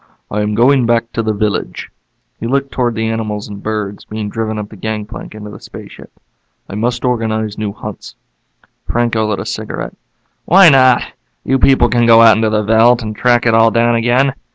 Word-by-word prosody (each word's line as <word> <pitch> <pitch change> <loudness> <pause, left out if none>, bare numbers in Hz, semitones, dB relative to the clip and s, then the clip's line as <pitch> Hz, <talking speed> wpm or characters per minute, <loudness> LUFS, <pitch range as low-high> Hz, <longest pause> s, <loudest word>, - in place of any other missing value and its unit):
"I 105 - -1
am 105 0 -2
going 125 +1 +3
back 115 0 0
to 115 - -2
the 110 -1 -1
village." 105 0 -3 0.5
He 115 - -4
looked 135 +2 -1
toward 120 -3 -1
the 110 0 -2
animals 110 -2 -4
and 100 -1 -9
birds 105 -2 -4
being 105 -1 -6
driven 110 0 -4
up 105 -1 -6
the - - -13
gangplank 105 +1 -6
into 105 -1 -9
the - - -11
spaceship. - - -12 0.6
"I - - -10
must 120 +4 -2
organize 110 -3 -1
new 105 -2 -3
hunts." - - -9 0.7
Franco 115 -2 0
lit 105 -2 -2
a - - -6
cigarette. - - -5 0.5
"Why 185 0 +7
not? 130 -3 +4 0.4
You 135 0 0
people 130 -3 +4
can 120 0 +1
go 115 0 +7
out 110 -2 +7
into 110 0 0
the 105 0 0
veldt 115 +3 +3
and 110 -1 -5
track 120 +1 +2
it 115 - +3
all 115 0 +5
down 120 +1 +1
again. 120 +4 +1
115 Hz, 195 wpm, -15 LUFS, 105-120 Hz, 0.7 s, Why